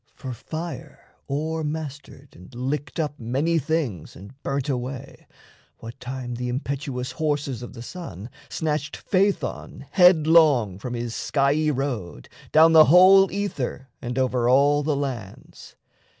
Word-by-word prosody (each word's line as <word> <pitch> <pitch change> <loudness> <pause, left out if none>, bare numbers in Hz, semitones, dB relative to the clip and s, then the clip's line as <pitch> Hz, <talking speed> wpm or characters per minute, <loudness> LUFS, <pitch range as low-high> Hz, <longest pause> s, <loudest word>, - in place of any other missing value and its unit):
For 130 -2 -6
fire 160 +5 -8 0.2
o'ermastered 150 -2 -5
And 90 +8 -15
licked 135 +3 -3
up 150 -2 -2
many 140 +9 0
things 145 - -3
and 100 +7 -12
burnt 140 -1 -2
away, 130 -1 -5 0.5
What 115 +1 -10
time 125 -1 -6
the 125 +1 -4
impetuous 130 0 -4
horses 145 -5 -2
of 120 - -8
the 115 -2 -9
Sun 120 - -8 0.2
Snatched 150 -1 -2
Phaethon 185 -8 -1
headlong 155 - +5
from 120 +3 -5
his 120 -1 -4
skiey 145 +4 +1
road 125 - -4 0.2
Down 160 +1 +6
the 155 -1 +9
whole 190 +4 +7
ether 145 -10 -4
and 125 -1 -5
over 125 -2 +1
all 145 +3 +4
the 150 0 0
lands. 125 -8 -7
140 Hz, 130 wpm, -24 LUFS, 125-155 Hz, 0.5 s, the